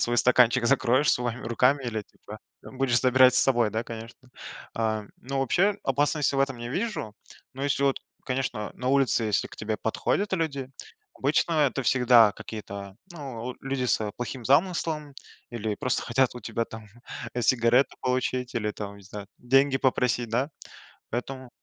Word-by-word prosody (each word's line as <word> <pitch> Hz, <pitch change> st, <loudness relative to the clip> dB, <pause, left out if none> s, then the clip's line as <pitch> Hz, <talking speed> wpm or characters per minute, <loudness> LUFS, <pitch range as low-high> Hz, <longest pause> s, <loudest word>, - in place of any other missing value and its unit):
свой 120 Hz, 0 st, +1 dB
стаканчик 125 Hz, 0 st, +4 dB
закроешь 130 Hz, +2 st, +3 dB
своими 120 Hz, 0 st, -2 dB
руками, 130 Hz, +4 st, +2 dB
или, 110 Hz, -3 st, -3 dB
типа, 105 Hz, +1 st, -13 dB, 0.2 s
будешь 130 Hz, -2 st, 0 dB
забирать 130 Hz, 0 st, +5 dB
с -, -, +4 dB
собой, 120 Hz, -4 st, +3 dB
да, 110 Hz, +2 st, -2 dB
конечно. 115 Hz, +3 st, -10 dB, 0.4 s
А, 110 Hz, -2 st, -1 dB, 0.2 s
ну 135 Hz, +2 st, -4 dB
вообще 190 Hz, +10 st, +2 dB
опасности 145 Hz, +1 st, +1 dB
в -, -, 0 dB
этом 135 Hz, -2 st, 0 dB
не 120 Hz, +1 st, -6 dB
вижу, 195 Hz, -, -3 dB, 0.4 s
но 135 Hz, -, -6 dB
если, 140 Hz, -1 st, 0 dB
вот, 135 Hz, -1 st, +2 dB, 0.3 s
конечно 125 Hz, -5 st, -2 dB
на 125 Hz, -, -3 dB
улице, 135 Hz, -4 st, +2 dB
если 105 Hz, -2 st, 0 dB
к -, -, -13 dB
тебе 110 Hz, 0 st, -3 dB
подходят 195 Hz, -, -1 dB
люди. 140 Hz, -7 st, -2 dB, 0.4 s
Обычно 145 Hz, +4 st, +1 dB, 0.2 s
это 135 Hz, +2 st, -4 dB
всегда 120 Hz, -4 st, +5 dB
какие-то, 100 Hz, -2 st, -8 dB, 0.2 s
ну, 125 Hz, -6 st, -6 dB
э, -, -, -19 dB
люди 135 Hz, -1 st, -2 dB
с 110 Hz, -3 st, 0 dB
плохим 125 Hz, +1 st, -5 dB
замыслом, 155 Hz, -1 st, +1 dB, 0.4 s
или 110 Hz, -3 st, -3 dB
просто 130 Hz, +4 st, -1 dB
хотят 125 Hz, +1 st, +1 dB
у 125 Hz, -, -8 dB
тебя, 115 Hz, +1 st, -2 dB
там, 110 Hz, -1 st, -10 dB, 0.5 s
сигареты 120 Hz, +2 st, +3 dB
получить, 125 Hz, 0 st, -1 dB
или, 105 Hz, -3 st, -1 dB
там, 100 Hz, -1 st, -7 dB
не 100 Hz, -, -15 dB
знаю, 100 Hz, +1 st, -9 dB
деньги 135 Hz, +2 st, +3 dB
попросить, 125 Hz, -3 st, +1 dB
да, 125 Hz, +6 st, 0 dB, 0.6 s
поэтому 130 Hz, +1 st, -5 dB
125 Hz, 160 wpm, -26 LUFS, 115-135 Hz, 0.6 s, забирать